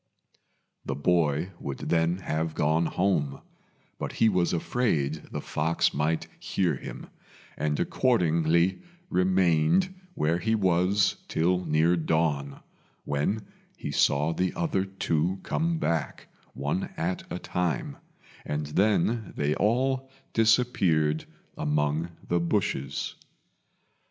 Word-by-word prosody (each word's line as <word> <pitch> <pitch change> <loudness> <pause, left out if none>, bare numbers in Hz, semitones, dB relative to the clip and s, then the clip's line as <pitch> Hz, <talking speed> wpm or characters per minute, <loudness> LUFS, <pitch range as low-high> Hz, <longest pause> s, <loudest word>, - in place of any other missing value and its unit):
The - - -3
boy 80 +1 +1
would 70 -1 -5
then 85 +1 +1
have 80 -1 -2
gone 80 +2 +2
home; 80 -8 0 0.6
but - - -4
he 115 - +4
was 90 -4 +2
afraid 80 - 0
the - - -3
fox 80 +2 0
might 75 +3 0
hear 90 -4 0
him, - - -8 0.5
and 75 -1 -1
accordingly 85 - +2 0.3
remained 90 - +3 0.2
where 80 +3 +1
he 110 +6 +1
was 95 0 +2
till 90 +3 +1
near 80 +3 +3
dawn, 80 -4 0 0.4
when 75 +10 -1 0.3
he - - -5
saw 75 +3 +2
the 90 +2 -1
other 145 - 0
two 95 -1 -1
come 165 +1 0
back, 85 - -2 0.3
one 75 +7 -1
at 90 +2 -3
a - - -2
time, 90 -4 -2 0.5
and 75 0 -2
then 105 +6 +1
they 75 +1 +1
all 130 +6 +1 0.2
disappeared 95 -10 +3 0.3
among 75 +2 0 0.2
the 85 - +2
bushes. 70 -5 -1
85 Hz, 110 wpm, -27 LUFS, 75-95 Hz, 0.6 s, he